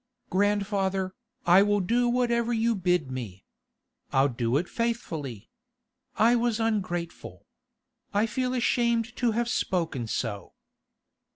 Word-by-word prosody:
'Grandfather, 195 -1 0 0.3
I 175 +3 +7
will 205 0 +3
do 240 +6 +2
whatever 240 -1 +1
you 230 0 +2
bid 180 -8 0
me. 115 -8 -6 0.7
I'll 135 +1 +3
do 120 +1 0
it 175 +4 -1
faithfully. 160 - -3 0.6
I 230 +3 +4
was 235 -1 +1
ungrateful. 185 -7 -3 0.7
I 205 +2 +2
feel 250 +3 -1
ashamed 235 -1 +1
to 240 -3 +1
have 235 +1 0
spoken 165 - -1
so. 105 -3 -4
205 Hz, 115 wpm, -27 LUFS, 170-235 Hz, 0.7 s, I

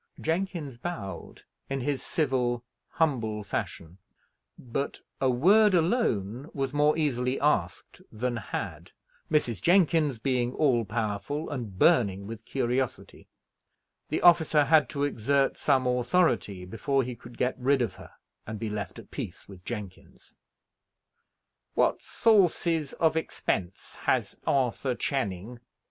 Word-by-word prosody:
Jenkins 165 -5 -2
bowed, 100 - -6 0.3
in 135 -1 -2
his 140 +1 -1
civil, 125 -6 0 0.2
humble 115 -9 0
fashion; 85 -2 -5 0.6
but 130 +3 -4 0.2
"a 130 - +2
word 190 - +5
alone" 150 - 0
was 135 -1 -2
more 150 +1 +3
easily 130 -4 0
asked 90 - 0
than 120 +3 -2
had, 110 - -5 0.4
Mrs. 150 -7 +1
Jenkins 165 -7 +3
being 125 +1 0
all 125 -7 +2
powerful, 110 +8 -3
and 115 -9 -5
burning 100 - +3
with 110 +1 -8
curiosity. 130 -1 -2 0.8
The - - -1
officer 160 -4 +5
had 155 0 +4
to 140 -1 -2
exert 140 +1 +1
some 135 -3 +2
authority 125 - +1
before 135 +8 0
he 125 0 -5
could 120 0 -14
get 125 +1 +1
rid 135 0 +3
of 105 -6 -3
her, - - -12 0.4
and 110 0 -5
be 110 0 -4
left 105 -1 -5
at - - -12
peace - - -6
with 95 -3 -13
Jenkins. 105 -5 -8 1.4
"What - - +2
sources 170 -8 +2
of 160 -1 +2
expense 95 - -2
has - - 0
Arthur 130 -1 +1
Channing?" 115 -3 -3
130 Hz, 125 wpm, -28 LUFS, 110-150 Hz, 1.4 s, word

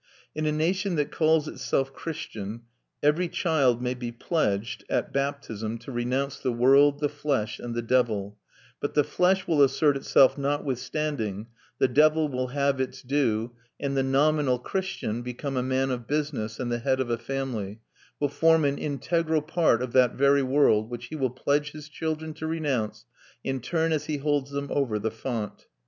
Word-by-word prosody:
In 155 0 -2
a - - +2
nation 180 +5 0
that 150 -2 0
calls 155 -1 +2
itself 135 0 -1
Christian 115 -9 -6 0.4
every 155 +5 +3
child 135 -10 +2
may 125 0 0
be 120 -1 -5
pledged, 115 - -1
at - - -1
baptism, 125 -6 -2
to 115 +4 -10
renounce 125 +3 -1
the 130 - -1
world, 135 +4 +5
the 145 - +3
flesh, 145 -6 -2
and 120 -1 -5
the 120 - -2
devil; 110 -4 0 0.4
but - - -3
the 150 - +5
flesh 185 +5 +2
will 160 -4 +2
assert 140 +1 +4
itself 135 0 +4
notwithstanding, 135 -5 -2 0.3
the - - +3
devil 155 +4 +4
will 130 -1 -2
have 140 +1 0
his 130 -1 -3
due, 120 -4 0 0.3
and 140 -1 -2
the 135 - +3
nominal 135 0 +2
Christian, 125 - -3
become 125 +3 -5
a 125 - +1
man 130 +1 0
of 120 -2 -4
business 145 -8 -2
and 120 - -2
the 120 - 0
head 130 +2 +1
of 125 -2 -1
a 115 - +1
family, 120 -5 -4 0.4
will 145 - +2
form 160 +2 +3
an 140 0 0
integral 155 +2 0
part 160 -3 +2
of 125 - -5
that 125 -2 +4
very 140 +1 +4
world 130 -5 +3
which 120 0 -6
he - - -6
will 135 -4 0
pledge 145 +4 0
his 150 -1 -9
children 160 0 -4
to 160 0 -5
renounce 130 -9 -2 0.4
in 135 0 -2
turn 160 +6 0
as 155 -2 0
he 150 - -2
holds 145 -1 0
them 140 0 -3
over 130 -7 0
the 110 +1 -2
font. 115 -2 -5
135 Hz, 180 wpm, -26 LUFS, 120-150 Hz, 0.4 s, world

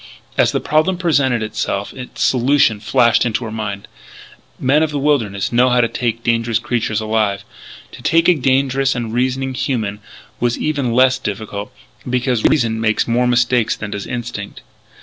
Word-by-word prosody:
As - - +3
the - - 0
problem 155 +4 +1
presented 140 -9 +1
itself 100 -2 -3
its 125 -1 -6
solution 125 -3 +3
flashed 115 +2 +3
into 120 +1 -1
her 110 - -6
mind. 105 -2 -5 0.7
Men 140 +4 +3
of 160 - +1
the 145 - -3
wilderness 120 -9 0
knew 125 +2 +4
how 125 0 +3
to 120 - +3
take 115 -1 -3
dangerous 115 -1 +1
creatures 115 -2 -1
alive. 110 -2 0 0.5
To - - -12
take 165 +1 +3
a 180 - +7
dangerous 135 -1 +1
and 115 -2 -4
reasoning 130 +2 -1
human 110 -6 -2 0.4
was 120 -1 0
even 140 -5 -1
less 130 +1 +4
difficult, 105 0 -5 0.4
because 125 -2 0
reason 115 -6 +2
makes 110 -1 +1
more 120 +1 +2
mistakes 125 -1 +2
than 105 -1 -7
does 100 -1 -5
instinct. 120 -4 -6
120 Hz, 165 wpm, -18 LUFS, 110-130 Hz, 0.7 s, a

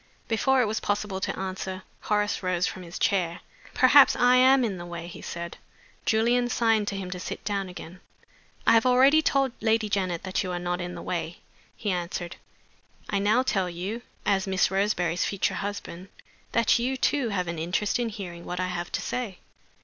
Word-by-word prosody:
Before 260 +4 +2
it - - +1
was 215 +1 -1
possible 205 -1 -2
to - - -2
answer, 190 0 -4 0.2
Horace 210 -1 0
rose 185 -1 0
from 185 - -4
his 175 -1 -8
chair. 175 -4 0 0.3
"Perhaps 265 +2 +7
I 245 0 +5
am 260 +1 +6
in 200 -5 -3
the 175 - -7
way?" 170 -1 -6
he 170 - -9
said. 170 0 -6 0.5
Julian 240 +2 +2
signed 225 -3 +2
to 200 - -2
him 185 -2 -5
to 180 - -5
sit - - -6
down 200 -2 -2
again. 180 0 -10 0.7
"I - - +6
have 230 +2 +4
already 265 +5 +6
told 275 -4 +2
Lady 220 -1 +2
Janet 185 -4 -1
that 190 +1 -1
you 185 -2 -3
are - - -1
not 175 0 -2
in 175 0 -5
the 170 - -7
way," 170 -1 -3 0.4
he 210 - -2
answered. 175 -1 -4 0.7
"I 200 - +1
now 215 +5 +3
tell 190 -7 0
you 190 +7 -4 0.2
as 195 -1 +1
Miss 190 -1 +2
Roseberry's 190 -3 +1
future 200 -2 0
husband 195 -3 -5 0.4
that 230 +1 +3
you, 260 +3 -1
too, 260 -1 +1
have 185 -4 -1
an 170 -1 -4
interest 185 +8 0
in 235 -1 0
hearing 180 -5 -7
what 180 - -5
I 185 0 -1
have 175 -1 -4
to - - -1
say." 230 -7 -3
195 Hz, 195 wpm, -26 LUFS, 180-225 Hz, 0.7 s, Perhaps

